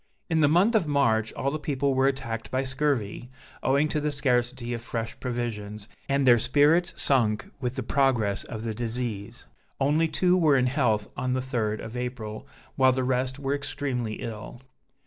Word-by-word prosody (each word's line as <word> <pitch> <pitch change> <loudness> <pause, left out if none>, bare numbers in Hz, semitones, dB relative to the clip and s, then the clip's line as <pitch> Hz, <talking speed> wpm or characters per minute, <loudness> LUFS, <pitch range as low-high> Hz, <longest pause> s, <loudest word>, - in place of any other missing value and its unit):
In 160 - +3
the 150 - +5
month 180 +10 +4
of 205 -8 +2
March 110 -7 +2
all 140 - -1
the 155 - -3
people 140 -2 0
were 130 +1 +3
attacked 115 -5 -3
by 130 +1 0
scurvy, 130 -4 -1 0.3
owing 140 +3 +2
to 150 - -1
the 150 0 0
scarcity 125 -3 0
of 115 - -4
fresh 115 -1 -4
provisions, 110 -4 -4 0.2
and 140 0 +2
their 120 -2 +7
spirits 145 +8 +3
sunk 115 -6 +1
with 125 0 -2
the 130 - -3
progress 120 -6 +1
of 110 -2 -7
the 115 -1 -2
disease; 115 -1 -4 0.3
only 150 +4 +3
two 180 +3 +2
were 155 -6 +4
in 125 - +3
health 120 -6 +1
on 130 0 -1
the 130 - 0
3d 115 -5 -2
of 115 +1 -8
April, 125 -1 -5 0.3
while 130 -1 +5
the 130 0 -1
rest 130 +1 0
were 140 -1 -2
extremely 140 -5 -3
ill. 110 +2 -7
130 Hz, 180 wpm, -26 LUFS, 115-140 Hz, 0.3 s, their